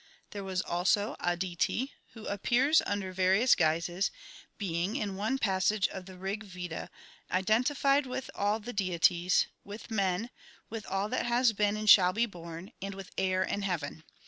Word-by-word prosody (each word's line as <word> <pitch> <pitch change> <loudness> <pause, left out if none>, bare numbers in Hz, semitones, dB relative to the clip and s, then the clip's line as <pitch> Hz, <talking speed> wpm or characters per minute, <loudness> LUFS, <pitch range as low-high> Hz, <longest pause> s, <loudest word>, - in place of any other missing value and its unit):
There 200 -1 -5
was 185 -1 -2
also 190 +4 +1
Aditi, 175 +8 -1 0.2
who 225 -2 -10
appears 245 +9 +3
under 200 -2 -2
various 190 +7 +4
guises, 170 +3 +1 0.5
being, 185 -1 -2
in 200 -2 -2
one 220 +7 -1
passage 195 -2 +2
of 190 -1 -8
the 185 -1 -11
Rig 195 +3 -3
Veda, 180 -4 -6 0.4
identified 260 +8 +2
with 255 +1 -5
all 205 +2 0
the 240 +3 -7
deities, 180 -2 +2 0.2
with 210 +3 -10
men, 200 +2 0 0.4
with 225 -2 -6
all 195 +1 -1
that 250 - -1
has 240 -1 +3
been 205 0 +1
and 215 0 -4
shall 185 -3 +8
be 230 +4 +2
born, 170 -3 -9
and 195 0 -5
with 195 -1 -9
air 185 0 +1
and 200 +1 -2
heaven. 160 -4 -3
195 Hz, 160 wpm, -30 LUFS, 180-220 Hz, 0.5 s, shall